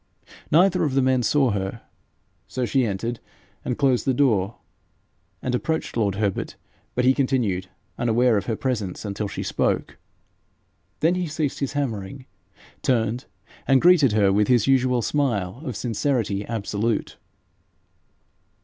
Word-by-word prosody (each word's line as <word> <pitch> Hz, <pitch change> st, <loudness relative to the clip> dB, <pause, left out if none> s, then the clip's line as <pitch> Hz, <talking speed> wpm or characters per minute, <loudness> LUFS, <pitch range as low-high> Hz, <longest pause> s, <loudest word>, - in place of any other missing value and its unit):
Neither 180 Hz, +2 st, +4 dB
of 140 Hz, -4 st, 0 dB
the 135 Hz, -, +4 dB
men 130 Hz, -1 st, +2 dB
saw 130 Hz, +2 st, +2 dB
her. 100 Hz, +2 st, -3 dB, 0.6 s
So 125 Hz, 0 st, -2 dB
she 130 Hz, 0 st, +1 dB
entered, 115 Hz, +4 st, -3 dB, 0.6 s
closed 135 Hz, -4 st, +2 dB
the 130 Hz, -2 st, +1 dB
door, 110 Hz, -7 st, +2 dB, 0.9 s
and 125 Hz, -, -1 dB
approached 160 Hz, +6 st, -2 dB
lord 105 Hz, -4 st, +1 dB
Herbert, 100 Hz, -2 st, -2 dB, 0.4 s
but 125 Hz, -, +1 dB
he 130 Hz, -, +6 dB
continued 125 Hz, -10 st, 0 dB, 0.3 s
unaware 120 Hz, 0 st, +3 dB
of 100 Hz, -2 st, -1 dB
her 115 Hz, -, 0 dB
presence 110 Hz, -7 st, -3 dB
until 100 Hz, +1 st, -3 dB
she 100 Hz, -, -5 dB
spoke. -, -, -1 dB, 1.0 s
Then 165 Hz, +4 st, +4 dB
he 180 Hz, -1 st, -1 dB
ceased 155 Hz, -2 st, -2 dB
his 140 Hz, -1 st, -2 dB
hammering, 130 Hz, -2 st, -3 dB, 0.6 s
turned, 120 Hz, 0 st, 0 dB, 0.4 s
and 135 Hz, -1 st, +5 dB
greeted 165 Hz, -8 st, +5 dB
her 100 Hz, -2 st, +3 dB
with 105 Hz, +1 st, +3 dB
his 120 Hz, -4 st, +3 dB
usual 125 Hz, -2 st, +2 dB
smile 120 Hz, -7 st, -1 dB
of 125 Hz, -6 st, -4 dB
sincerity 115 Hz, -3 st, -1 dB
absolute. 110 Hz, 0 st, -2 dB
120 Hz, 135 wpm, -24 LUFS, 105-135 Hz, 1.0 s, he